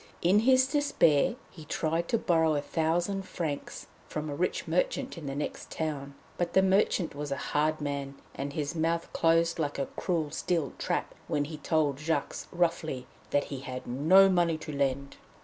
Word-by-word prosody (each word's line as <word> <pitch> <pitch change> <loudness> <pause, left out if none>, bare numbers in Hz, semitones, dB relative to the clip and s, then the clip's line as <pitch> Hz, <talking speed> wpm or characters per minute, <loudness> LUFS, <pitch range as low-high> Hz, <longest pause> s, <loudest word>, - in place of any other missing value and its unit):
In 185 +4 +5
his 260 +3 +5
despair 265 - +3 0.2
he 160 - -11
tried 165 +2 -1
to 230 - +2
borrow 160 -6 +2
a 145 - 0
thousand 175 +6 0
francs 165 -6 -5 0.2
from 155 -1 -4
a - - -3
rich 180 +4 -1
merchant - - 0
in 165 -4 -7
the 135 - -3
next 145 - -4
town; 140 -3 -4 0.2
but 175 - -1
the 190 - +5
merchant 190 -2 +2
was 145 0 -5
a 140 - -1
hard 155 +1 +1
man, 140 -2 -3 0.2
and 140 +1 -4
his 145 0 -2
mouth 165 0 -1
closed 165 0 +3
like 145 -2 -1
a 140 - 0
cruel 165 -5 -1
steel 165 -6 -1
trap - - -1
when 145 - 0
he 155 +1 -7
told 150 -4 +1
Jacques 160 +2 -1 0.2
roughly 165 -6 0 0.2
that 145 - +2
he 135 - -4
had 130 -1 -6
no 160 +10 +6
money 175 -3 +2
to 155 0 -7
lend. 140 -1 -1
160 Hz, 180 wpm, -29 LUFS, 145-175 Hz, 0.2 s, no